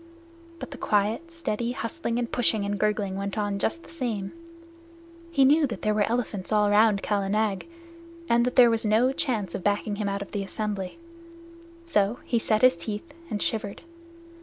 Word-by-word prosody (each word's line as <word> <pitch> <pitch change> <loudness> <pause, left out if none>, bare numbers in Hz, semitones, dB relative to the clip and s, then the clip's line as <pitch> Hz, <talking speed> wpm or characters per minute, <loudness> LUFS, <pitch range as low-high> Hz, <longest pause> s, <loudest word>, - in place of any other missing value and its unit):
But - - -8
the 275 - -8
quiet, 215 +11 0
steady 245 -8 -2
hustling 235 0 -3
and 240 -1 -2
pushing 220 -4 +2
and 200 0 -2
gurgling 210 -2 0
went 200 +1 -4
on 205 -1 -1
just 335 +12 -1
the - - -15
same. 230 -11 -3 1.0
He 280 -5 +4
knew 295 +2 +5
that 235 - -7
there 215 - +2
were 210 0 +1
elephants 225 -5 -2
all 210 -1 +3
round 210 -1 +4
Kala 200 -2 0
Nag, 210 - 0 0.6
and 235 0 +4
that 250 - -1
there 245 -2 +7
was 225 -1 0
no 225 +5 +3
chance 220 - -2
of 185 - -4
backing 205 0 0
him 205 -1 -1
out 200 0 -2
of - - -15
the 205 - -2
assembly; 200 - -3 0.9
so 215 -8 +1
he 235 - +1
set 215 0 +1
his 255 - +7
teeth 205 +10 -6 0.2
and 210 -3 -1
shivered. 205 -3 -3
215 Hz, 185 wpm, -26 LUFS, 205-240 Hz, 1.0 s, there